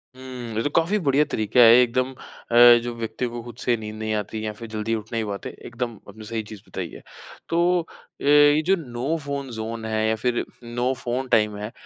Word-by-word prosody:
हुँ, 125 -3 -8
ये 115 - 0
तो - - 0
काफ़ी 170 +6 +3
बढ़िया 145 -3 +3
तरीका 110 +3 0
है, 115 -1 +9
एकदम 125 +2 +1
अ, 120 -2 +4
जो 120 0 -4
व्यक्ति 115 +2 -3
को 120 0 -6
खुद 120 -1 -10
से 120 - +2
नींद 110 -1 -7
नहीं 110 0 -3
आती 110 +1 -4
या 105 - -3
फिर 115 +2 -9
जल्दी 110 +1 -2
उठ 110 0 -7
नहीं 115 -1 -1
पाते, 100 -1 -5 0.2
एकदम 120 -2 -4 0.2
आपने 110 +2 -11
सही 115 +1 -3
चीज़ 105 -1 -11
बताई 90 -2 -5
है। - - -10 0.5
तो 165 - +1 0.2
अ, 165 - -17
ये 145 +1 +6
जो 190 +2 +4
नो 135 -2 -3
फ़ोन 140 -1 -4
ज़ोन 110 +1 -5
है, 110 0 0
या 110 - +2
फिर 120 +2 -1 0.2
नो 120 +2 -1
फ़ोन 125 +2 -2
टाइम 105 -3 +2
है, 105 +2 -6
120 Hz, 220 wpm, -24 LUFS, 110-130 Hz, 0.5 s, है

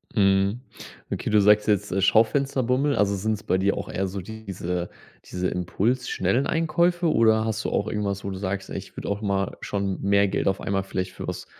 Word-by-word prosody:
Mhm. 100 +2 +3 0.5
Okay, - - -2
du 105 - +4
sagst 105 +1 +5
jetzt, 105 -3 +1
äh, 95 +2 0
Schaufensterbummel. 130 +5 +2
Also, 100 0 +2
sind's 105 +2 -2
bei 95 - +1
dir 100 +1 +1
auch - - -5
eher 95 +1 -1
so 95 +1 -5
diese 90 -4 -5 0.4
diese 90 0 -2
Impuls 110 +8 -1
schnellen 130 +3 +1
Einkäufe 170 +1 +1
oder 110 -1 +4
hast 110 0 -2
du - - -1
auch 105 - 0
irgendwas, 100 -2 -2
wo 100 - -3
du 95 - -5
sagst: 95 0 -4
„Ey, - - -3
ich - - -10
würde - - -5
auch 100 +1 -2
mal 100 -2 -1
schon 100 -2 -2
mehr 100 0 +3
Geld - - -1
auf 95 0 0
einmal 95 -1 -1
vielleicht 95 -1 -3
für - - -8
was - - -5
100 Hz, 205 wpm, -25 LUFS, 95-110 Hz, 0.5 s, sagst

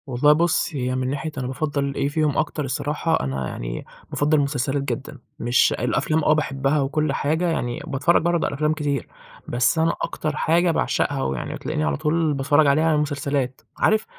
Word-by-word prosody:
والله 135 +3 +4
بُص، 170 +2 +1
هي 130 -2 -1
من 130 0 -1
ناحية 145 +3 -3
أنا 130 -1 -2
بافَضّل 140 +1 -2
إيه - - 0
فيهم 150 -1 0
أكتر 150 -1 -1
الصراحة، 150 +4 -1
أنا 65 -1 -2
يعني - - -5 0.2
بافَضّل 150 +2 +2
المسلسلات 140 -1 0
جدًا. 145 +1 -4 0.2
مش 120 +1 +3
الأفلام 155 +6 0
آه 155 - +4
باحبها 140 -1 0
وكل 145 +1 0
حاجة 160 +6 0
يعني 120 -7 -2
باتفرج 145 +3 +2
برضه 170 0 +1
على - - -4
أفلام 150 +2 +1
كتير، 145 -4 -2 0.4
بس 120 +6 +2
أنا 165 +1 +2
أكتر 155 -1 -2
حاجة 170 +3 +2
باعشقها، 145 -3 0
ويعني 65 -2 -3
بتلاقيني 75 - -3
على 75 -2 0
طول 155 - +1
باتفرج 145 +2 +3
عليها 155 +4 +3
هي - - +3
المسلسلات 140 -3 -1 0.2
عارف 215 0 +2
145 Hz, 180 wpm, -23 LUFS, 135-155 Hz, 0.4 s, والله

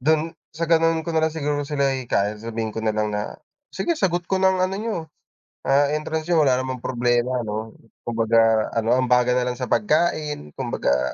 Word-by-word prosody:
dun, 160 +4 +1 0.2
sa 165 - 0
ganun 165 -1 +3
ko 170 - -3
nalang 160 -1 +1
siguro 145 -1 -1
sila 140 -2 +1
hihikayatin 105 -4 -1
sabihin 110 -1 -3
ko 110 - -4
nalang 110 -1 0
na 105 0 -3 0.4
sige 345 - -2
sagot 175 -2 +1
ko 190 - +2
na 190 0 +4
ang 185 - -1
ano 185 +1 -2
niyo, 220 +1 -2 0.7
ah, 140 +1 +4
entrance 155 +1 -2
niyo 165 -2 +4
wala 130 -2 +3
namang 130 -1 -5
problema 120 0 +1
no. 110 +1 -5 0.3
Kumbaga 115 -1 +3
ano 115 +2 +2
ambagan 125 -1 +3
nalang 125 0 -1
sa 125 - -2
pagkain, 155 - +1
kumbaga, 65 +1 0
130 Hz, 180 wpm, -23 LUFS, 115-160 Hz, 0.7 s, na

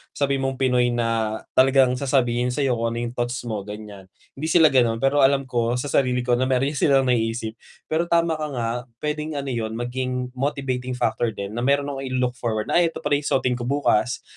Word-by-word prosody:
sabihin 140 -1 0
mong 135 - -2
Pinoy 125 -2 +2
na 115 -2 0 0.2
talagang 130 -1 +4
sasabihin 125 -3 +1
sa'yo 125 -2 0
kung 115 0 -1
ano 120 - -2
yung 120 - -3
thoughts 120 0 -3
mo, 110 -3 -3
ganyan. 105 -2 -9 0.2
Hindi 150 +4 -5
sila 160 -1 +5
ganun, 120 -2 +2
pero 140 +2 +3
alam 135 0 +4
ko 120 -2 -1
sa 130 +3 -3
sarili 125 -2 +1
ko 125 - -1
na 130 - +1
meron 135 +2 +1
silang 140 -2 +3
naiisip, 115 -2 -1 0.3
pero 165 +2 +1
tama 170 -2 +1
ka 155 - -2
nga, 115 -2 -1 0.3
puwedeng 150 +1 -2
ano 140 -2 -3
yun 110 -2 -3
maging 125 +1 -3
motivating 130 -2 -2
factor 115 -2 -1
din 100 0 -5
na 120 - -4
meron 140 +3 +1
akong 135 -1 -5
ilu-look 125 -1 -1
forward 110 -3 -2
na, - - +4
"Ay 170 - +4
'eto 165 - -7
pala 145 -1 +2
ung 145 - -6
susuotin 125 -2 +1
ko 120 - -4
bukas, 125 -4 +1
125 Hz, 210 wpm, -23 LUFS, 120-140 Hz, 0.3 s, sila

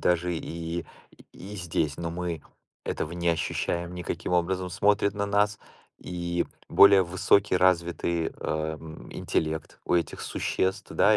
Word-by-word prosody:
даже 90 0 +2
и 85 +1 -4 0.5
и 100 +3 -9
здесь, 80 -5 -1
но 85 -1 -3
мы 85 -3 -3 0.4
этого 80 - -3
не 85 0 -1
ощущаем 85 +2 -1
никаким 90 0 -4
образом. 90 +1 +1
Смотрят 100 +2 +2
на 100 0 -1
нас 105 0 +2 0.4
и 85 -1 -2 0.2
более 100 -1 +8
высокий 95 +2 +3
развитый, 85 -2 +2
э, - - -3 0.5
м, 80 -1 -10
интеллект 80 0 -2
у - - +1
этих 85 -2 0
существ 95 0 -1
да, 110 0 +5
85 Hz, 135 wpm, -27 LUFS, 85-95 Hz, 0.5 s, более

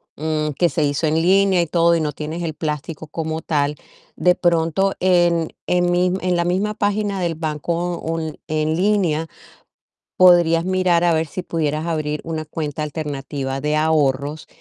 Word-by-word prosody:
mm, 155 0 -1
que 175 - +3
se 160 - -1
hizo 145 +3 0
en 155 - +1
línea 190 0 +4
y 170 - -1
todo 170 +1 +3
y 160 - -1
no 150 -1 -2
tienes 155 +3 -5
el 160 -2 -3
plástico 150 0 -5
como 160 +1 -4
tal, 150 -2 0 0.4
de 180 0 +3
pronto 170 +3 +1
en 175 -3 +2 0.2
en 175 0 +2
mis 180 +1 +2
en 180 -1 0
la 170 - +1
misma 195 +4 0
página 205 -1 -1
del 170 -3 -1
banco 165 +3 -2
un 160 -1 -4
en 155 0 0
línea 180 -5 +1 0.9
podrías 175 -2 +5
mirar 185 -2 +2
a 170 -1 +3
ver 160 0 +1
si 185 - -5
pudieras 155 -1 -2
abrir 150 -2 -2
una 160 -1 -4
cuenta 155 -1 -4
alternativa 140 -3 -4
de 150 +1 0
ahorros, 150 -1 0
165 Hz, 170 wpm, -20 LUFS, 155-175 Hz, 0.9 s, podrías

